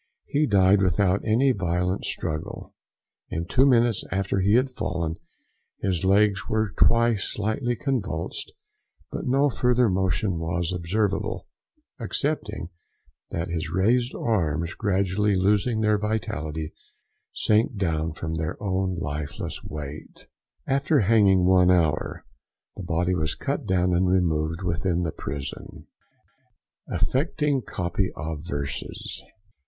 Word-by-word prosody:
He 150 +1 +1
died 100 -1 +4
without 95 +1 +2
any 120 +5 +3
violent 90 -2 -1
struggle. 75 0 -4 0.6
In 85 +1 -3
two 130 +9 +4
minutes 120 -4 +3
after 95 0 0
he 100 +3 +3
had 130 +2 +2
fallen 85 -8 -3 0.6
his 95 -4 0
legs 100 0 +3
were 110 -2 0
twice 115 -1 +3
slightly 110 +4 -1
convulsed, 105 - -3 0.6
but - - -4
no 135 +3 +3
further 125 -2 +2
motion 95 -1 0
was 85 +2 -1
observable, 100 +4 -1 0.5
excepting 110 - -2 0.6
that 85 +1 -3
his 80 -3 -2
raised 115 +8 +2
arms, 85 -7 0
gradually 100 0 +1
losing 105 +4 +2
their 105 -1 +3
vitality, 80 -7 -3 0.6
sank 110 +1 +2
down 80 -4 0
from 80 0 -5
their 80 +1 -3
own 95 -2 -1
lifeless 75 -3 -5
weight. 75 0 -8 0.4
After 140 +1 +2
hanging 100 -3 +4
one 90 -1 +5
hour, 80 -4 +1 0.5
the - - -7
body 90 +1 0
was 80 -2 0
cut - - -3
down 90 -1 +2
and 90 +1 +2
removed 85 -1 +1
within 90 0 0
the 80 - -1
prison. 70 -1 -7 1.0
AFFECTING 145 0 0
COPY 95 -2 -2
OF 80 -1 -4
VERSES. 70 -4 -5
95 Hz, 120 wpm, -25 LUFS, 85-110 Hz, 1.0 s, one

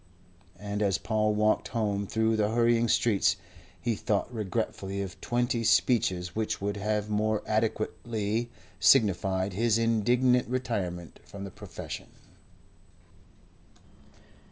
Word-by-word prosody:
And 105 0 -4
as 100 -4 +2
Paul 110 -1 0
walked 105 +1 +2
home 100 -3 -1
through 110 +1 +1
the 105 -1 +1
hurrying 120 +1 +3
streets, 110 -2 +3 0.4
he 120 - 0
thought 105 +3 -1
regretfully 100 -2 -3
of 95 -2 -9
twenty 120 0 0
speeches 95 -7 +2
which 110 0 -1
would 100 +1 -2
have 105 +1 -1
more 105 0 0
adequately 110 +1 -1 0.3
signified 95 -5 +3
his 115 +2 +2
indignant 120 +3 +2
retirement 100 -10 -3
from 100 -1 -9
the 100 - -7
profession. - - -8
110 Hz, 110 wpm, -28 LUFS, 100-115 Hz, 0.4 s, hurrying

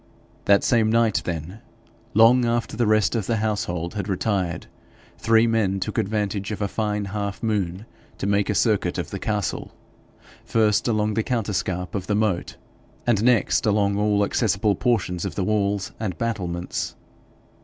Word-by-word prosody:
That 100 0 +4
same 115 -3 +3
night, 115 -2 +2
then, 85 +4 -5 0.6
long 115 +3 +6
after 120 -1 -1
the 115 -1 +1
rest 110 -1 +3
of 110 -5 -1
the 115 - +1
household 100 -6 -2
had 105 -2 -4
retired, 95 -3 -1 0.5
three 115 0 +4
men 110 -4 +1
took 95 - -2
advantage 100 -1 -1
of 105 -3 -4
a 100 - 0
fine 105 0 -2
half 100 +2 -4
moon 100 -3 -1 0.3
to - - -4
make 100 0 +1
a - - +1
circuit - - +1
of - - -4
the - - -4
castle, 105 -5 -3 0.7
first 110 -1 +2
along 105 -2 +1
the 110 - +1
counterscarp 95 -6 -2
of 95 -3 -4
the 105 - +1
moat, 105 -4 0 0.5
and 115 -3 +2
next 125 -2 +3
along 100 -1 +2
all 105 0 +2
accessible 105 -1 +1
portions 90 -5 0
of - - -4
the 95 - -1
walls 100 0 0
and 100 -6 -3
battlements. 90 -7 -3
105 Hz, 160 wpm, -23 LUFS, 95-110 Hz, 0.7 s, long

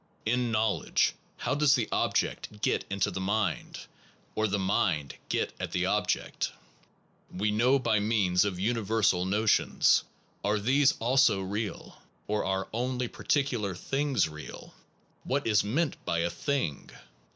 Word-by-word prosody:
In 120 +1 +1
knowledge, 110 0 +1 0.2
how 125 - -1
does 145 -1 +4
the 120 -5 0
object 105 0 -1
get - - +1
into 100 0 0
the 95 - -4
mind? 105 +2 -1 0.5
or 110 0 +1
the 100 0 0
mind 90 -7 0 0.2
get - - -1
at - - -4
the - - +1
object? - - -1 0.8
We 105 +3 -1
know 120 +6 +3
by 110 -5 +1
means 100 -4 +2
of 100 -3 -2
universal 105 -3 +1
notions. 105 +3 +3 0.4
Are 105 +1 +1
these 135 +7 +3
also 125 -4 +3
real? 100 0 -5 0.2
Or 105 0 -1
are 95 0 -1
only 125 +1 -1
particular 120 -10 -1
things 135 - 0
real? 75 -1 -10 0.5
What 140 +2 -1
is 105 -2 +3
meant 145 +10 -1
by 85 0 0
a 85 0 0
thing 85 - -2
110 Hz, 140 wpm, -29 LUFS, 95-125 Hz, 0.8 s, does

